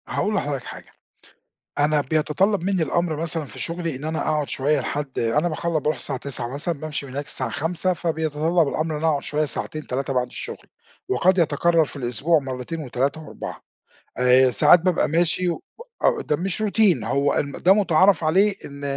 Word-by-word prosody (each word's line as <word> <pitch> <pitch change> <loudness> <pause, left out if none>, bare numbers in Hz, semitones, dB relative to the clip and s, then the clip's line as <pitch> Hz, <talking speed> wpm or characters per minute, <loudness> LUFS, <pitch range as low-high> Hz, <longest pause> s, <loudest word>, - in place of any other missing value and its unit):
هاقول 210 - -1
لحضرتَك 145 - -2
حاجة، - - -10 0.9
أنا 150 0 +3
بيتطلب 160 +7 +1
منّي 190 -3 +1
الأمر 170 +2 0
مثلًا 160 0 -1
في - - -11
شغلي 165 -3 -3
إن 135 +4 -7
أنا 160 0 -2
أقعُد 150 -2 -1
شوية 145 +2 +1
لحد 140 +1 -4
أنا 130 +9 +1
باخلَ 170 +2 -3
باروح 150 +2 0
الساعة 130 - -1
09:00 125 -3 -3
مثلًا 150 +2 -1
بامشي 150 -2 -4
من 135 - -10
هناك 140 +2 -4
الساعة - - -2
17:00 175 +4 -1
فبيتطلب 160 -1 0
الأمر 155 +2 -2
إن - - -2
أنا 165 - 0
أقعد 145 -3 0
شوية 150 +1 0
ساعتين، 155 +1 -4
3 135 +1 -2
بعد 125 -1 0
الشغل، - - -8 0.4
وقد 185 +1 +3
يتكرر 165 0 +3
في - - -12
الأسبوع 140 +5 +1
مرتين 135 +4 -5
و3 140 +3 -2
و4 155 - -8 0.6
آآ 125 +1 +5
ساعات 175 - +6
بابقى 180 -2 +1
ماشي 175 +3 +1
و 170 - -3 0.4
آه، 470 -3 +3
ده 150 - 0
مش 190 +4 -3
Routine 210 -3 +3
هو 140 +1 +1
ده 145 +6 +2
متعارف 190 -2 +3
عليه 195 +6 +3
إن 140 0 -10
155 Hz, 180 wpm, -23 LUFS, 140-170 Hz, 0.9 s, ساعات